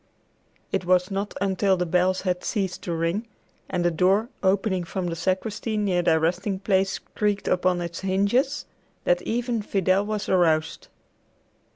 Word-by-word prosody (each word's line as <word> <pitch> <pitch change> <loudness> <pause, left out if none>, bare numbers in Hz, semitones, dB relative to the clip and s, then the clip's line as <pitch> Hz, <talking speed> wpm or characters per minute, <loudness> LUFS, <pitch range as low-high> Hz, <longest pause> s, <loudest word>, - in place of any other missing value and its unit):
It 195 - 0
was 180 +1 +2
not 200 +1 -3
until 195 0 +2
the 180 - 0
bells 180 +2 +2
had 180 -2 -1
ceased 190 -4 -2
to 175 - -3
ring, 170 +8 -1 0.4
and 175 - -1
the 175 - +3
door, 190 +7 +2
opening 190 -1 +1
from 180 +2 -4
the 170 -1 -2
sacristy 205 +5 -2
near 195 -4 +1
their 160 -2 +3
resting 180 +5 0
place, 195 0 +1
creaked 205 -1 -2
upon 180 0 +2
its 170 -1 -5
hinges, 205 +10 +1 0.4
that - - +2
even 235 0 -1
Fidel 195 -1 +1
was 210 0 -3
aroused. 160 -4 +1
190 Hz, 155 wpm, -25 LUFS, 180-205 Hz, 0.4 s, the